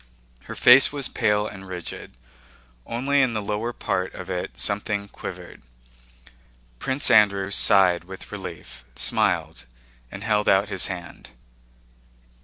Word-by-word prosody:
Her - - -8
face 125 +2 +7
was 140 -3 -1
pale 105 -1 0
and 95 -2 -9
rigid. 90 -8 -8 0.7
Only 135 +4 0
in 125 -4 0
the - - 0
lower 105 +3 -3
part 95 -5 -3
of 90 +1 -8
it 90 -1 -5
something 100 0 -1
quivered. - - -10 1.2
Prince 130 -1 +1
Andrew 100 -3 +4
sighed 90 -3 +4
with 95 +1 -11
relief, 65 - -9
smiled, - - 0 0.4
and 100 - -8
held 105 -1 +1
out 95 +2 +3
his 95 - +1
hand. 90 -3 -9
100 Hz, 125 wpm, -23 LUFS, 95-110 Hz, 1.2 s, face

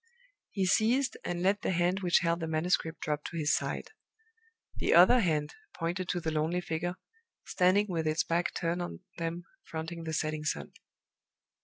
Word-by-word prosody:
He 195 -2 -1
ceased, 235 +8 +2
and 175 0 -3
let 200 +2 +2
the - - -1
hand 180 +1 +1
which 180 -2 +3
held 170 0 +1
the 165 - -3
manuscript 160 +1 0
drop 150 -1 -2
to 170 - -5
his 150 -2 +2
side. - - -3 0.9
The - - +2
other 185 +9 +8
hand 155 -7 0 0.2
pointed 175 +2 -3
to 175 - 0
the 160 -1 -2
lonely 155 +3 0
figure, 175 +1 -3 0.5
standing 185 +3 +3
with 165 -4 -1
its 155 +1 +2
back 170 +1 0
turned 170 +1 -1
on 175 - -6 0.2
them, 165 +1 -3 0.2
fronting 165 +1 -6
the 160 - -3
setting 155 0 -1
sun. 75 - -3
170 Hz, 170 wpm, -30 LUFS, 160-180 Hz, 0.9 s, other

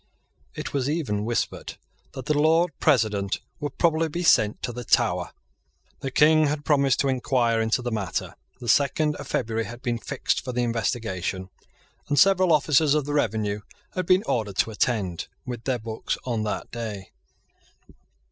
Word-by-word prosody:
It - - -5
was 140 -1 0
even 125 -10 -1
whispered 120 0 -2 0.4
that 130 -2 -7
the 150 - +1
Lord 165 +3 +3
President 105 -9 +2 0.2
would 145 -2 -5
probably 165 -1 +2
be 175 +4 -3
sent 105 -10 +4
to 120 - -2
the 120 +1 -6
Tower. - - +2 0.7
The 135 - -3
King 155 +3 +5
had 145 +1 -3
promised 140 -3 +3
to 140 - 0
enquire 120 -3 +1
into 110 +3 0
the 120 - -2
matter. 100 -5 -3 0.3
The 120 - -8
second 150 +3 +2
of - - -8
February 110 0 -1
had 120 +1 -10
been 120 -1 -1
fixed - - -2
for 125 - -5
the 125 0 0
investigation; 100 -5 -2 0.6
and 145 - +1
several 185 -1 +5
officers 150 -1 +4
of 150 -2 0
the 145 - -3
revenue 110 -6 0 0.3
had 185 -2 -3
been 185 +2 +4
ordered 105 - -1
to 115 - +2
attend 105 -6 -1 0.2
with 120 -3 -6
their 130 -2 +1
books 110 -1 -4
on 120 -4 -1
that 105 - -4
day. 110 -5 -6
125 Hz, 165 wpm, -25 LUFS, 110-150 Hz, 0.7 s, King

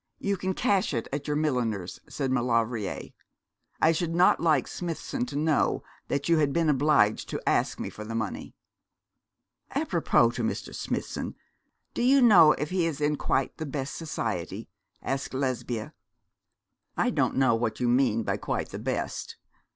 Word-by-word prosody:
You 200 0 -1
can 190 0 -2
cash 195 - +1
it 115 - -2
at 145 +1 -3
your 150 - 0
milliner's,' 120 - -1
said 135 -3 -2
Maulevrier. 115 -4 0 0.7
'I 160 - +6
should 165 0 -1
not 180 +1 +5
like 155 -6 +2
Smithson 180 - -4
to - - -7
know 150 0 +1 0.2
that 140 0 -1
you 165 -1 +4
had 145 -2 +2
been 165 +1 +2
obliged 140 -7 +3
to - - -3
ask - - +1
me - - -4
for 105 - -8
the 115 +1 -6
money.' 110 -3 -4 1.2
'Apropos 120 0 +2
to 120 0 -4
Mr. 110 - -3
Smithson, - - -4 0.6
do - - -2
you 265 +3 +5
know 185 - +7
if 150 - -4
he 180 -3 +1
is 155 -3 -3
in 150 0 +1
quite 135 -1 0
the 160 - -4
best 140 -1 -4
society?' 110 - -4 0.4
asked 135 0 -3
Lesbia. 125 -4 -2 1.0
'I - - +2
don't - - +1
know 130 -2 +4
what 115 0 -1
you 125 - +1
mean 120 -2 +2
by - - -1
quite - - -3
the - - -6
best. - - -3
140 Hz, 165 wpm, -27 LUFS, 115-160 Hz, 1.2 s, know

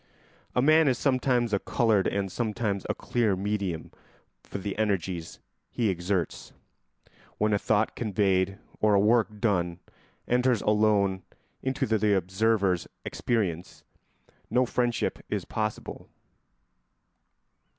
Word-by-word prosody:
A 125 - +3
man 155 +1 +5
is 130 -3 +2
sometimes 125 -4 +1
a 100 - +3
coloured 110 -4 +2
and 100 -1 -1
sometimes 105 -3 -2
a - - 0
clear 115 -5 0
medium 100 -4 -3 0.5
for - - -7
the 100 0 -4
energies 95 -5 -1 0.3
he 115 -4 0
exerts. 90 -1 -2 0.8
When 105 0 +1
a 100 - +2
thought 105 +1 +1
conveyed 95 -3 +1 0.2
or 105 -1 +4
a - - +5
work 110 0 +2
done 90 -6 0 0.5
enters 125 -2 +2
alone 105 -3 +2 0.4
into 130 0 -1
the 105 -2 +2
observer's 95 0 +1 0.2
experience, 95 -8 -2 0.7
no 125 +2 +3
friendship 120 -1 -1
is - - -2
possible. 110 -1 -4
105 Hz, 115 wpm, -27 LUFS, 95-115 Hz, 0.8 s, man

